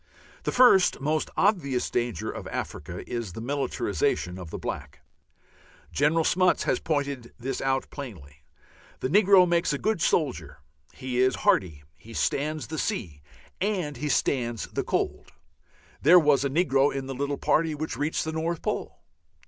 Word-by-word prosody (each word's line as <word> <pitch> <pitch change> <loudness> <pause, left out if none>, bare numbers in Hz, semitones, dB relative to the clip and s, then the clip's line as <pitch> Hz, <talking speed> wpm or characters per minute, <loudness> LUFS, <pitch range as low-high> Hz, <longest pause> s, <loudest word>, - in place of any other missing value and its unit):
The - - 0
first 240 -8 +5
most 155 +2 -1
obvious 155 - +1
danger 120 -2 -2
of - - -7
Africa - - -6
is 115 -7 -4
the - - -7
militarization 125 -7 -1
of 90 -3 -8
the - - -5
black. 70 0 -6 0.9
General 155 +3 +2
Smuts 185 +2 +3
has - - +1
pointed 140 -6 -3
this 130 +2 -4
out 135 0 0
plainly. 90 - -9 0.6
The 130 - -1
negro 195 0 +6
makes 170 -2 +1
a - - -1
good 215 +1 -1
soldier; 150 -7 0 0.3
he 130 -1 -4
is 130 0 +3
hardy, 80 -7 +2
he 110 +8 -13
stands 155 +2 -1
the 160 -1 -5
sea, 85 - -3 0.4
and 180 - -1
he 150 +3 -3
stands 120 -6 0 0.2
cold. - - -2 0.7
(There 165 +6 +7
was 145 -5 +4
a 140 - 0
negro 140 -2 +2
in 135 -1 -4
the 135 - -5
little 140 +2 -2
party 160 -1 +1
which 155 -3 -4
reached 145 +6 -1
the 160 - -2
North 160 +1 -2
Pole.) - - -4
140 Hz, 155 wpm, -26 LUFS, 120-160 Hz, 0.9 s, There